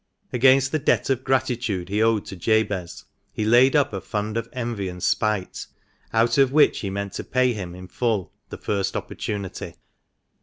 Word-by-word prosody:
Against 130 +2 +4
the 155 - 0
debt 140 - +1
of 130 -1 -1
gratitude 120 -8 -1
he 105 +2 0
owed 110 -2 +2
to - - -8
Jabez 100 -2 -1 0.3
he 110 - -2
laid 125 +5 +5
up 145 -6 +2
a 95 - -3
fund 105 +1 -3
of 115 0 -3
envy 115 -6 -3
and 90 0 -8
spite, 105 -4 -1 0.4
out 115 +3 +2
of 135 -2 +4
which 150 +2 +4
he 100 - -3
meant 100 0 -4
to - - -4
pay 130 -1 +1
him 90 -5 -6
in 90 0 -10
full 110 -1 -1 0.2
the - - -7
first 100 -2 -2
opportunity. 100 -3 -5
110 Hz, 180 wpm, -23 LUFS, 100-125 Hz, 0.4 s, laid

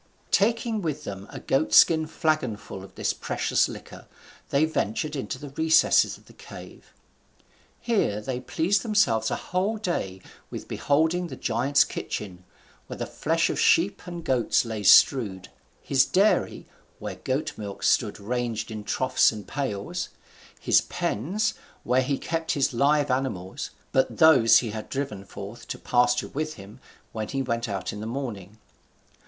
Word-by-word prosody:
Taking 225 +1 +1
with 155 -3 -3
them 100 -4 -7
a - - -8
goat 135 +4 0
skin 160 -2 +6
flagon 155 -8 0
full 95 -2 -9
of 95 - -14
this - - -1
precious - - 0
liquor, - - -11 0.4
they 140 +3 +3
ventured 155 0 -2
into 135 -1 -4
the 140 +1 -9
recesses 160 +2 +3
of - - -23
the - - -17
cave. - - -12 0.9
Here 200 - 0
they 125 +4 -4
pleased 175 +9 0
themselves 125 - +2
a - - -1
whole 190 +5 -2
day 95 - -3 0.3
with - - -7
beholding 160 +5 +1
the - - -8
giant's 135 +5 +2
kitchen, 90 -9 -6 0.4
where - - -7
the - - -3
flesh 165 +2 0
of - - -3
sheep 180 +5 +3
and 175 -1 -6
goats 125 -2 +2
lay 110 -2 -4
strewed; 100 -2 +5 0.3
his 135 -1 +3
dairy, 200 +8 +1 0.3
where - - -6
goat 145 +4 -2
milk 100 -2 -7
stood - - +2
ranged 115 0 -3
in 110 -1 -6
troughs - - +2
and 105 -4 -9
pails; 135 - -3 0.5
his - - +4
pens, 200 - -2 0.3
where 125 +2 +2
he 135 +1 -1
kept 165 +2 -2
his 140 -1 +1
live 145 +3 +2
animals; 115 -9 -3 0.2
but 130 0 +1
those 145 -9 +7
he 115 -4 -1
had 110 0 -7
driven 135 -8 -4
forth 100 +3 -10
to - - -5
pasture 125 0 +1
with 155 +2 -4
him 100 +5 -13 0.3
when 110 -1 -4
he 135 -1 -2
went 115 -2 -2
out 100 -2 -3
in 105 - -7
the 110 - -5
morning. 115 -6 -6
130 Hz, 160 wpm, -26 LUFS, 110-160 Hz, 0.9 s, those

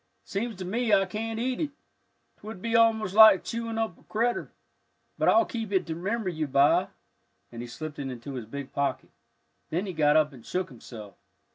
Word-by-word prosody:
Seems 225 +3 -3
to 185 0 -6
me 225 +5 -1
I 195 -1 +5
can't 225 +2 -4
eat 255 +3 -1
it, 305 - -1 0.7
'twould 215 -1 -9
be 230 +3 -2
almost 225 -4 +3
like 220 -2 +8
chewing 230 -1 -4
up 225 -6 -2
a - - -22
critter, 235 +3 -1 0.7
but - - +4
I'll 345 - +5
keep 225 -4 -5
it 190 -2 +1
to 165 - -4
remember 205 +5 -2
you 160 -3 -3
by," 140 +1 +4 0.6
and 120 -1 -7
he 120 - -6
slipped 150 +5 -7
it 135 -1 -3
into 125 +2 -7
his 125 -4 -5
big 140 +3 -7
pocket. 140 -1 -2 0.6
Then 175 +5 -1
he 190 - -5
got 150 -1 +4
up 150 -2 +2
and 120 -4 -13
shook 185 0 -3
himself. 110 -5 -11
185 Hz, 200 wpm, -27 LUFS, 145-225 Hz, 0.7 s, like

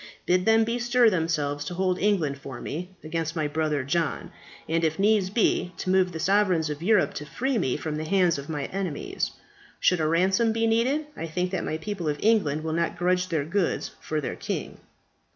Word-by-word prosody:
Bid 180 +1 +2
them 225 0 +5
bestir 240 0 +3
themselves 150 -5 -1
to 175 - -5
hold 185 0 0
England 170 -9 +1
for 135 -1 -8
me 175 +5 -5
against 160 +1 -3
my 155 -2 0
brother 150 -2 -1
John, 155 +3 -1 0.4
and, 165 +1 0
if 160 -1 +1
needs 205 -1 +3
be, 195 -4 +1
to 185 - -2
move 185 -1 +3
the 160 - -6
sovereigns 185 -4 +2
of 150 +1 -6
Europe 210 +2 +3
to 150 - -6
free 250 - -1
me 130 - 0
from 155 -1 -4
the 155 - -3
hands 175 -3 +2
of 140 - -9
my 145 -3 -2
enemies. 185 -6 -3 0.5
Should 180 - +3
a 155 - +1
ransom 190 +7 +2
be 225 0 +1
needed, 245 +7 +2
I 165 - -5
think 180 +3 -2
that 190 - -2
my 155 - -2
people 175 -1 -3
of 145 - -1
England 175 -9 +2
will 160 0 -2
not 170 +1 -1
grudge 180 +1 +1
their 160 -5 -1
goods 175 +2 -1
for 155 - -2
their 145 - -4
king." - - -5
175 Hz, 205 wpm, -26 LUFS, 155-200 Hz, 0.5 s, them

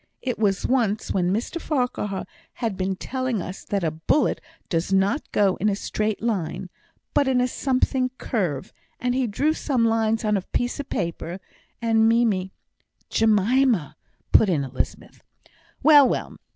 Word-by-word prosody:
It 250 -4 -2
was 200 -3 +1
once 225 -5 +1
when 180 -1 +1
Mr 240 - -2
Farquhar 245 -9 -2 0.3
had 225 -5 -3
been 190 0 -1
telling 255 +2 -2
us 180 +2 -6
that 200 -2 -1
a 160 - +1
bullet 160 - +1 0.3
does 165 +1 -1
not 195 +9 +1
go 195 -3 +2
in 210 - +1
a 200 - 0
straight 215 +1 -2
line, 185 -4 -2 0.4
but 285 - +3
in 260 -1 +3
a 250 - +2
something 255 0 0
curve, 175 - -2 0.3
and 245 0 0
he 255 -1 +1
drew 285 +9 +1
some 260 -7 0
lines 225 0 +1
on 210 -1 +2
a - - -2
piece 245 +8 -2
of 280 - -5
paper; 170 0 -3 0.4
and 225 -1 +4
Mimie 215 -5 +2 0.3
" - - -43
"Jemima," 220 - +2 0.4
put 215 - +5
in 155 -6 +1
Elizabeth. 135 - -5 0.6
"Well, 290 -4 +8
well! - - -3
220 Hz, 160 wpm, -24 LUFS, 190-250 Hz, 0.6 s, Well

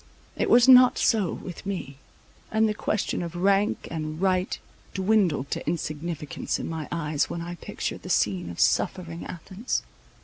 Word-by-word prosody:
It - - 0
was 240 +1 +6
not 255 -1 +8
so 210 -7 +2
with 180 - -7
me; 180 -9 -5 0.5
and 220 0 +3
the 210 - 0
question 210 -2 -1
of 170 0 -5
rank 195 +3 +2
and 155 -1 -4
right 185 -1 +1 0.4
dwindled 190 -8 +2
to - - -3
insignificance 155 -1 -3
in - - -5
my 160 -2 -4
eyes, 150 -3 -1
when 170 - -4
I 175 +1 -5
pictured 175 - -5
the - - -9
scene 95 -4 +1
of 85 - -8
suffering 170 -3 0
Athens. 190 +7 -4
175 Hz, 160 wpm, -26 LUFS, 155-200 Hz, 0.5 s, not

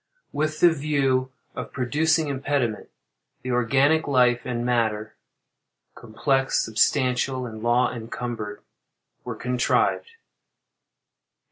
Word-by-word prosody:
With 155 +1 -2
the 175 - +7
view 135 -4 0 0.2
of - - -6
producing 155 +5 +1
impediment, 135 -5 -2 0.5
the 130 - -3
organic 140 +6 +2
life 125 -3 +3
and 120 -1 -2
matter, 110 -3 -1 0.8
(complex, 135 +4 0
substantial, 130 +2 +1
and 110 -2 -8
law 120 +2 +2
encumbered,) 115 -2 -6 0.6
were - - -5
contrived. 125 - 0
125 Hz, 95 wpm, -24 LUFS, 120-140 Hz, 0.8 s, the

